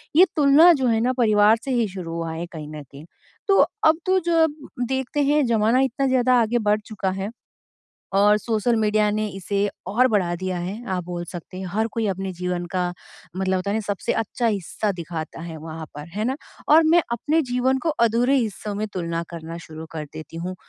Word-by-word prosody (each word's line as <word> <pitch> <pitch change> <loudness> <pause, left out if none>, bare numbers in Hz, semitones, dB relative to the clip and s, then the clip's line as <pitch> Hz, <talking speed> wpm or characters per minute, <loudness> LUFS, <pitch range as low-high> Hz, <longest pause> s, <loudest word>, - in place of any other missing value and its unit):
ये 360 - +8
तुलना 300 +4 +7
जो 265 -5 0
है 225 -1 +2
ना 250 +2 +1
परिवार 215 -2 +5
से 270 - -2
ही 235 -3 +2
शुरू 185 -3 -7
हुआ 165 -1 -3
है 165 +2 -4
कहीं 155 -3 -7
न 150 -1 -7
कहीं। 140 +3 -13 0.4
तो 390 -1 +4 0.3
अब 315 +1 +5
तो 375 0 +3
जब 325 -3 +3 0.3
देखते 265 +2 -1
हैं 290 0 +3
ज़माना 230 +2 +3
इतना 270 +1 0
ज़्यादा 255 -1 +3
आगे 230 +2 +1
बढ़ 210 +1 +3
चुका 195 -3 -3
है 200 - -3 0.9
और 205 +1 +5
सोशल 225 +2 0
मीडिया 215 -1 +2
ने 215 +1 -1
इसे 200 +1 -1 0.2
और 250 +5 +3
बढ़ा 185 -6 +1
दिया 185 0 -3
है 180 +3 -4 0.2
आप 180 -1 -3
बोल 175 0 -5
सकते 180 +2 -8
हर 220 +3 +1
कोई 225 -2 -1
अपने 190 0 -2
जीवन 180 0 -3
का 180 - +1 0.5
मतलब 190 0 0
होता 185 +2 -2
है 205 - 0
ना, 220 - 0
सबसे 205 -2 -2
अच्छा 230 +2 -1
हिस्सा 205 0 -1
दिखाता 165 -3 -6
है 165 -1 -7
वहाँ 160 0 -7
पर, 150 +2 -8
है 210 +6 -3
ना? 260 +3 -1 0.3
और 310 +2 +7
मैं 335 +1 +5
अपने 295 +8 +1
जीवन 255 +2 +2
को - - +1 0.2
अधूरे 245 +5 +2
हिस्सों 215 -4 -2
में 215 +1 -2
तुलना 170 -2 -2
करना 165 0 -7
शुरू 160 -1 -9
कर 155 -2 -4
देती 160 +1 -9
हूँ 180 +2 -4
210 Hz, 205 wpm, -23 LUFS, 175-250 Hz, 0.9 s, ये